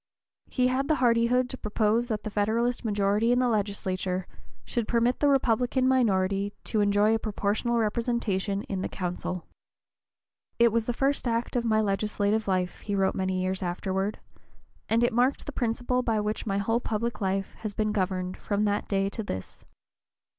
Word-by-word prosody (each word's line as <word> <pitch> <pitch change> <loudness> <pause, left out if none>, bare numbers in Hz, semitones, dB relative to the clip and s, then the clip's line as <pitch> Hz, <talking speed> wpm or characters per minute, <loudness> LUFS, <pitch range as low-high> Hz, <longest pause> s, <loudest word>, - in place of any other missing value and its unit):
He 250 - +1
had 265 +2 0
the 310 - +3
hardihood 245 0 +3
to 260 - -7
propose 215 +2 +1
that 220 -3 -3
the 215 - -4
Federalist 230 +5 0
majority 205 +1 +2
in 245 - +3
the 250 0 +3
legislature 190 -4 -1 0.4
should 235 -3 -2
permit 240 +1 +2
the 290 - +4
Republican 255 -1 +2
minority 200 -5 +2
to 215 - 0
enjoy 205 +1 +3
a 225 - +1
proportional 215 +3 -1
representation 215 -3 0
in 190 -2 -4
the - - -2
council. 180 0 -4 1.1
"It 235 -1 +5
was 230 0 0
the - - +2
first 270 +2 0
act 230 +1 -1
of 240 -1 +1
my 220 -1 +3
legislative 210 +1 0
life," 185 -2 0
he 205 - -3
wrote 195 -1 +2
many 185 -1 -1
years 185 0 -1
afterward, 190 +3 -2 0.7
"and 230 +2 +3
it 240 - +2
marked 250 +4 +2
the - - -5
principle 245 0 0
by 225 -3 0
which 210 +1 -2
my 195 -1 0
whole 225 +4 +1
public 230 0 -3
life 195 0 -1
has 215 -2 -5
been 215 -1 0
governed 185 -2 -1
from 205 0 -1
that 205 0 0
day 195 -1 +1
to 220 - -5
this. 95 - -6
215 Hz, 175 wpm, -27 LUFS, 195-235 Hz, 1.1 s, It